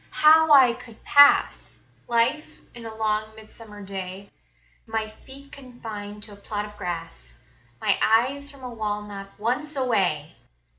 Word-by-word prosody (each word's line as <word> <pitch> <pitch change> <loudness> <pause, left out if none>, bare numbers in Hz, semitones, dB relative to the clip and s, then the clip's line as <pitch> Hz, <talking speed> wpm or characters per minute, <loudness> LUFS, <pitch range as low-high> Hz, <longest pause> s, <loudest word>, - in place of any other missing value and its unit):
How 315 +1 +5
I 260 -4 +7
could 235 -2 -14
pass 285 0 +4 0.3
Life 240 +6 0 0.2
in 235 -1 -9
a 220 - -9
long 215 0 -2
midsummer 215 -1 -12
day, 195 0 -8 0.6
My 220 -1 -2
feet 270 +6 -15
confined 215 -6 -9
to 210 -1 -13
a - - -14
plot 205 +1 -5
of 210 0 -12
grass, 165 - -7 0.4
My - - +1
eyes 265 +6 +2
from 280 -2 -13
a 250 -1 -7
wall 210 -2 -3
not 200 -1 -9
once 255 +8 -2
away! 190 - -1
220 Hz, 145 wpm, -24 LUFS, 205-255 Hz, 0.6 s, I